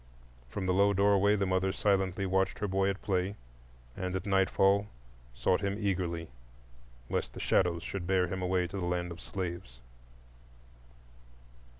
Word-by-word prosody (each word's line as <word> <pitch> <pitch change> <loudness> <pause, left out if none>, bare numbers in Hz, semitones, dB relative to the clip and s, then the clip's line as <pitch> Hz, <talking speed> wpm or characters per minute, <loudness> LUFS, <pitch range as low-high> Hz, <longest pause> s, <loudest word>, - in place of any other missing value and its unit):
From 95 +9 -4
the 90 - +2
low 100 +2 +4
doorway 100 +1 +4
the 100 -1 0
mother 95 0 +1
silently 95 -1 +1
watched 95 0 +1
her 105 - -2
boy 95 0 +1
at 100 +1 -4
play, 95 0 0 0.6
and 90 0 -3
at 95 - -3
nightfall 95 +1 +3 0.5
sought 90 +9 +1
him 100 0 -1
eagerly 90 - -2 0.8
lest - - -2
the - - -8
shadows 85 -3 +1 0.2
bear 90 +1 +2
him 95 +1 -4
away 90 0 +1
to 90 +3 -6
the 90 - -2
land 90 0 -1
of 85 - -8
slaves. 85 -10 -5
95 Hz, 150 wpm, -31 LUFS, 90-100 Hz, 0.8 s, low